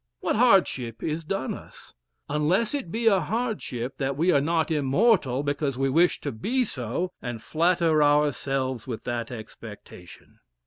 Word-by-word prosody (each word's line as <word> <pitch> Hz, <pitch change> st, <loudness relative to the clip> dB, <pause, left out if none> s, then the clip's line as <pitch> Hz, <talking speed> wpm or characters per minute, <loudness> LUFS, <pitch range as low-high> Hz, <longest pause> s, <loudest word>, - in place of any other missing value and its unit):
What -, -, -1 dB
hardship 180 Hz, -, +2 dB
is 160 Hz, +1 st, -2 dB
done 160 Hz, -3 st, -3 dB
us? -, -, -12 dB, 0.3 s
Unless 165 Hz, -, +1 dB
it 275 Hz, -, -3 dB
be 230 Hz, +3 st, -2 dB
a 200 Hz, -4 st, +5 dB
hardship, 200 Hz, -, -3 dB
that 135 Hz, -1 st, -1 dB
we 170 Hz, +4 st, +3 dB
are 140 Hz, -, +3 dB
not 165 Hz, +2 st, 0 dB
immortal 145 Hz, -, +2 dB
because 145 Hz, -2 st, -2 dB
we 135 Hz, 0 st, +1 dB
wish 170 Hz, +5 st, +3 dB
to 145 Hz, -, -3 dB
be 245 Hz, -, -1 dB
so, 135 Hz, -, -3 dB
and 120 Hz, -2 st, -5 dB
flatter 165 Hz, +2 st, +2 dB
ourselves 135 Hz, -4 st, +1 dB
with 115 Hz, -4 st, -5 dB
that 120 Hz, -1 st, -3 dB
expectation. 110 Hz, -5 st, -11 dB
150 Hz, 150 wpm, -26 LUFS, 130-180 Hz, 0.3 s, a